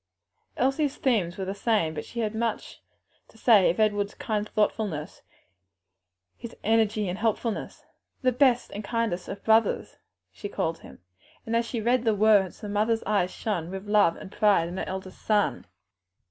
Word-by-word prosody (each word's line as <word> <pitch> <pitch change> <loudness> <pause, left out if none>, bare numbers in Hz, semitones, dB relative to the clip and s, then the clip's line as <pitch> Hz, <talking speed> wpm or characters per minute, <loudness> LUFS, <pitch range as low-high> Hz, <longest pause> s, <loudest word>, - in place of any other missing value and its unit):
Elsie's 275 +2 +1
themes 205 -10 0
were 190 - -3
the 190 - -3
same, 200 -6 0
but 150 - -5
she 235 - -5
had 215 -1 -1
much 230 +1 -3 0.5
to - - -21
say 215 -5 +5
of 170 - -1
Edward's 205 -1 +1
kind 210 -1 -2
thoughtfulness, 210 -7 -1 1.1
his 235 - -9
energy 215 -1 +2
and 180 +2 -4
helpfulness; 225 0 -2 0.4
"the 255 - +4
best 250 -1 +2
and 205 - -6
kindest 225 -5 -2
of 200 - -7
brothers," 220 0 +2 0.3
she 205 - -7
called 165 -3 -2
him, - - -15 0.4
and 225 - -2
as 230 0 +1
she 235 - -3
read 240 +2 +1
the 220 -3 +2
words 205 -3 +3
the 210 - -6
mother's 215 +2 0
eyes 200 -3 +1
shone 180 -5 -3
with 190 +2 -7
love 205 -5 +4
and 190 - -10
pride 205 -6 +3
in 175 +2 -6
her - - -2
eldest 190 0 -7
son. 210 - 0
210 Hz, 170 wpm, -26 LUFS, 190-225 Hz, 1.1 s, say